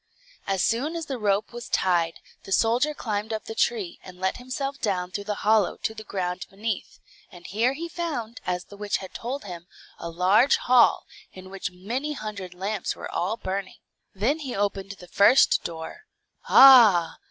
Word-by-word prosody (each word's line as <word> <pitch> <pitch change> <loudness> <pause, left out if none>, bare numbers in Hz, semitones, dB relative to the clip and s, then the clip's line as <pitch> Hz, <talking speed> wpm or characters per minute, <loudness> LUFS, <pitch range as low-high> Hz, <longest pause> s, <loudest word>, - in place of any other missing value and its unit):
As 195 -2 0
soon 275 +9 0
as 330 -1 -4
the 270 -3 -5
rope 205 +1 0
was 240 -1 -8
tied, 170 -3 +1 0.2
the - - -11
soldier 240 +9 +2
climbed 210 -3 -3
up 220 -1 -4
the 225 - -6
tree, 430 - -1
and 185 -1 -12
let 190 0 -1
himself 275 +2 -5
down 185 -4 -1
through 200 +2 -5
the 210 - -2
hollow 215 -2 +3
to 220 - -3
the 220 -1 -9
ground 180 -3 -4
beneath; 210 +1 -5 0.3
and 175 -1 -14
here 230 +6 +1
he 330 +5 -5
found, 290 -10 -5
as 180 0 -2
the 205 - -14
witch 205 0 -1
had 190 - -10
told 260 +5 -5
him, 175 -3 -9 0.3
a 170 - -5
large 190 +10 +4
hall, 250 -1 +4 0.3
in 185 0 -12
which 195 -1 -4
many 235 +12 -4
hundred 205 -7 -7
lamps 200 +3 -3
were - - -8
all 195 +6 -1
burning. 190 -1 -5 0.4
Then 245 +11 0
he 270 -5 -5
opened 200 -1 -2
the 180 -2 -14
first 205 +8 +4
door. 165 - -7 0.4
"Ah!" 225 -11 +7
210 Hz, 180 wpm, -25 LUFS, 185-250 Hz, 0.4 s, Ah